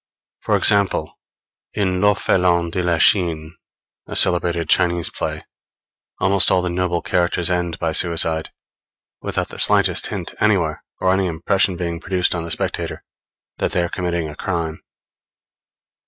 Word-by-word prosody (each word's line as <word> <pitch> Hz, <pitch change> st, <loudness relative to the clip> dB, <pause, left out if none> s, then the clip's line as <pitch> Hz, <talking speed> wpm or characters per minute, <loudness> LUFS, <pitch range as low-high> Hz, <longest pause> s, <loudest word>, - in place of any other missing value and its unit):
For -, -, 0 dB
example, 100 Hz, -1 st, +2 dB, 0.6 s
in 95 Hz, -3 st, 0 dB
L'Orphelin 90 Hz, -4 st, +2 dB
de 90 Hz, +1 st, -2 dB
la 85 Hz, -1 st, 0 dB
Chine 85 Hz, -2 st, +2 dB, 0.5 s
a -, -, -7 dB
celebrated 85 Hz, -2 st, +3 dB
Chinese 85 Hz, -1 st, +2 dB
play, -, -, -4 dB, 0.7 s
almost 95 Hz, 0 st, +3 dB
all 90 Hz, -1 st, +2 dB
the 90 Hz, -, -2 dB
noble 90 Hz, -1 st, -1 dB
characters 90 Hz, 0 st, 0 dB
end 85 Hz, -2 st, -2 dB
by 80 Hz, -2 st, -2 dB
suicide; 80 Hz, -1 st, +1 dB, 0.7 s
without -, -, -3 dB
the -, -, -8 dB
slightest -, -, +2 dB
hint -, -, -6 dB
anywhere, 90 Hz, -8 st, +1 dB, 0.2 s
or 95 Hz, 0 st, +2 dB
any 95 Hz, 0 st, +1 dB
impression 90 Hz, +3 st, +1 dB
being 85 Hz, -1 st, -4 dB
produced 90 Hz, +1 st, -1 dB
on 85 Hz, -2 st, -3 dB
the 85 Hz, -, -6 dB
spectator, 75 Hz, -, -3 dB, 0.6 s
that -, -, -1 dB
they 90 Hz, -, +1 dB
are 85 Hz, -, -2 dB
committing 85 Hz, -3 st, -3 dB
a 75 Hz, -, -9 dB
crime. 85 Hz, -3 st, -4 dB
85 Hz, 140 wpm, -20 LUFS, 85-95 Hz, 0.7 s, celebrated